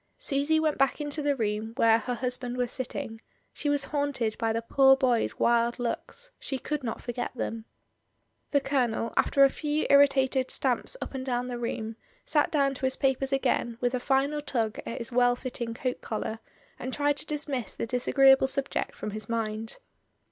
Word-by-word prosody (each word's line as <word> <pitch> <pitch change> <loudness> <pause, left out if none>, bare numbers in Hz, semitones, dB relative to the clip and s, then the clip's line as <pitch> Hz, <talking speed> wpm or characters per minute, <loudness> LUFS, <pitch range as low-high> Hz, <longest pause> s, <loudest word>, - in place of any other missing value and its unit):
Susy 285 +3 +1
went 310 -3 0
back 275 +2 +2
into 295 0 -2
the 290 -1 +1
room 220 -1 -2
where 230 -3 +5
her 245 +2 -3
husband 250 +1 -2
was 245 -1 -1
sitting; 225 -3 -5 0.3
she 295 - -2
was 290 -1 +2
haunted 285 -7 -1
by 225 -1 +1
the 230 +1 -2
poor 270 +3 +5
boy's 250 -4 +1
wild 235 0 +2
looks, 265 - -4
she 270 - -3
could 300 +2 -4
not 225 - -4
forget 240 0 -3
them. 225 -2 -4 0.8
The 285 - +2
Colonel, 245 -5 0
after 275 - +4
a 275 - +7
few 300 0 -1
irritated 270 -2 +4
stamps - - +1
up - - -9
and 265 -1 -4
down 250 -1 -2
the 245 -1 -4
room, 225 -1 -4 0.3
sat 300 -1 +2
down 275 -3 +2
to 265 - -4
his 260 - 0
papers 270 0 +1
again 250 -3 0
with 245 0 0
a 255 - 0
final 275 +3 +1
tug 230 -7 -2
at - - -4
his 235 +1 -6
well 245 0 +4
fitting 240 -2 -5
coat 250 +1 -3
collar, 220 0 -4 0.4
and 255 - -4
tried 290 +1 +1
to 300 - -5
dismiss 290 -5 -2
the - - -2
disagreeable 265 +3 +4
subject 275 0 -1
from 210 - -5
his 215 +1 -6
mind. 225 -1 -2
255 Hz, 185 wpm, -28 LUFS, 230-275 Hz, 0.8 s, a